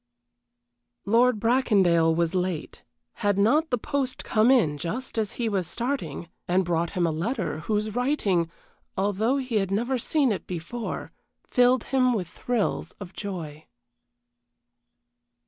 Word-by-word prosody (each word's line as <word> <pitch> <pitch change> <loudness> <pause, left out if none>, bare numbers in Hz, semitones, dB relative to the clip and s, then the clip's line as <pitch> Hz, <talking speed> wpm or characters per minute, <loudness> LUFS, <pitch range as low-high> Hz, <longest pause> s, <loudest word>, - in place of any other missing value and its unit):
Lord 230 +2 +4
Bracondale 195 -9 +3
was 170 0 +1
late: 180 -3 -2 0.4
had 205 -2 +2
not 290 +11 +3
the 245 - +1
post 270 +1 -2
come 220 +2 +3
in 165 - +3
just 220 - -4
as 220 -2 -1
he 235 - -2
was 195 -5 -1
starting, 235 - -3 0.2
and 185 +1 +2
brought 170 0 0
him 180 -3 +1
a 165 - +1
letter, 185 - -2
whose 210 +5 -1
writing, 210 - +1 0.5
although 205 +7 +1
he 255 -4 -1
had 195 -2 0
never 240 +6 0
seen 275 0 +1
it 200 - -4
before, 185 +7 -5 0.4
filled 250 0 +4
him 255 -1 +2
with 190 -7 -2
thrills 235 +4 -2
of 190 -2 -10
joy. 165 -7 -6
210 Hz, 135 wpm, -26 LUFS, 175-245 Hz, 0.5 s, Lord